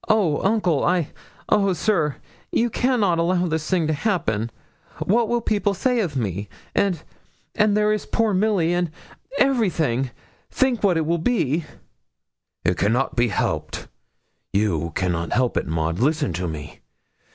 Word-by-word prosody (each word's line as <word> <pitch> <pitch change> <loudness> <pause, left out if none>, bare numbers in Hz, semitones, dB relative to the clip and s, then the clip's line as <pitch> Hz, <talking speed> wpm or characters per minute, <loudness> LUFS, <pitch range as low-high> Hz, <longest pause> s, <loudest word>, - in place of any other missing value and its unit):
'Oh, 200 -9 +3
uncle 190 -8 +2
I 175 -3 +1 0.4
oh, 200 -2 +3
sir! 165 -6 +1 0.4
you 235 0 +1
cannot 215 -9 +2
allow 175 +1 +2
this 160 -2 -2
to 180 -4 +2
happen. 140 - 0 0.5
What 225 +3 +1
will 240 0 +1
people 205 -3 0
say 250 +6 +1
of 175 -10 -1
me? 100 -3 -2 0.2
And 180 -6 +1 0.5
and 210 -1 +3
there 210 0 +3
is 215 - -3
poor 225 -3 +1
Milly 185 -4 +2
and 175 -1 0 0.5
everything! 170 - +2 0.4
Think 260 -4 +1
what 190 -5 +3
it 160 - 0
will 170 +2 +1
be.' 165 - +1 1.0
'It 90 +1 +2
cannot 120 +7 +1
be 120 0 +3
helped 105 - -2 0.6
you 90 -6 0
cannot 85 -3 -1
help 125 -1 +1
it, - - -1
Maud. 80 +2 -1
Listen 145 - +1
to 90 +2 -2
me. 75 -2 -7
170 Hz, 145 wpm, -23 LUFS, -, 1.0 s, Oh